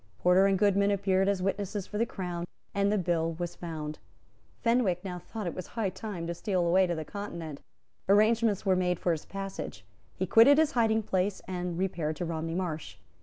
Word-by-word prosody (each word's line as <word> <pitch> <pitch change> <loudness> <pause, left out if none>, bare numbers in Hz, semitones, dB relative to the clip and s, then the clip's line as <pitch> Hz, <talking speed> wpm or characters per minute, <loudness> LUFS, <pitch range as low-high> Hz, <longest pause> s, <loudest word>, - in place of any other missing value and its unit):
Porter 180 - +5
and 195 -1 +2
Goodman 200 0 +3
appeared 195 -1 +2
as 195 -2 0
witnesses 195 0 -2
for 210 - -5
the 230 - +2
Crown; 175 -3 -4 0.3
and 200 0 +2
the 210 - +2
bill 165 -3 0
was 175 +1 -4
found. 155 -3 -6 0.6
Fenwick 230 -7 +2
now 180 -2 -4
thought 220 +4 -7
that 175 - -2
it - - -12
was 185 - -6
high 220 -5 -2
time 190 -6 -5
to 170 - -2
steal 180 0 0
away 185 +2 +4
to 175 - -1
the 160 -1 -4
Continent. 170 -8 -6 0.5
Arrangements 215 0 +4
were 190 -1 +4
made 180 -1 +1
for 175 - +1
his 160 -2 -3
passage. 195 - -6 0.3
He 185 - -1
quitted 230 +9 +7
his 315 -1 +4
hiding 225 -4 +2
place, 190 0 0
and 180 -2 -3
repaired 175 -4 -1
to 175 - -3
Romney 165 0 -3
Marsh. 170 -4 -4
185 Hz, 200 wpm, -29 LUFS, 170-205 Hz, 0.6 s, quitted